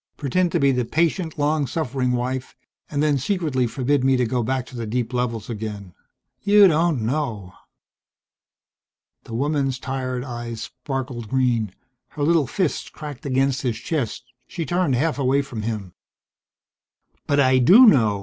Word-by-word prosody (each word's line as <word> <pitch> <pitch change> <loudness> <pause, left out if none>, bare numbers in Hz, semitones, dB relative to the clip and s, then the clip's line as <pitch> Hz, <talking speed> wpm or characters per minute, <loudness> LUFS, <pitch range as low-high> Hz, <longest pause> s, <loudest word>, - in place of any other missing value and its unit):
Pretend 170 +6 0
to 170 - +2
be 140 -1 +4
the 125 -1 0
patient, 160 +5 0
long 150 -1 +1
suffering 130 -3 -1
wife 125 +1 -3 0.3
and 145 0 -1
then 145 -2 +2
secretly 150 -6 0
forbid 130 +3 0
me 135 0 +3
to 125 - +2
go 125 +1 -1
back 130 +2 -1
to 130 - -13
the 115 -2 -4
deep 120 +2 -2
levels 115 -3 -2
again! 105 -5 -6 0.5
You 205 -1 +6
don't 160 -6 +1
know!" 115 -8 -2 1.7
The 115 - -7
woman's 140 0 0
tired 130 -1 -3
eyes 120 -3 -6
sparkled 130 -3 -5
green. 120 -7 0 0.3
Her 145 - -5
little 160 -2 +3
fist 185 - -2
cracked 145 -3 -8
against 135 0 +1
his 120 -4 -1
chest. 125 -3 -3 0.2
She 170 -3 -4
turned 175 -3 +1
half 150 +3 0
away 135 +1 +2
from 125 -6 -6
him. 105 -5 -4 1.3
"But 145 - +2
I 130 -1 +4
do 195 - +8
know. 110 - +4
130 Hz, 155 wpm, -22 LUFS, 120-150 Hz, 1.7 s, do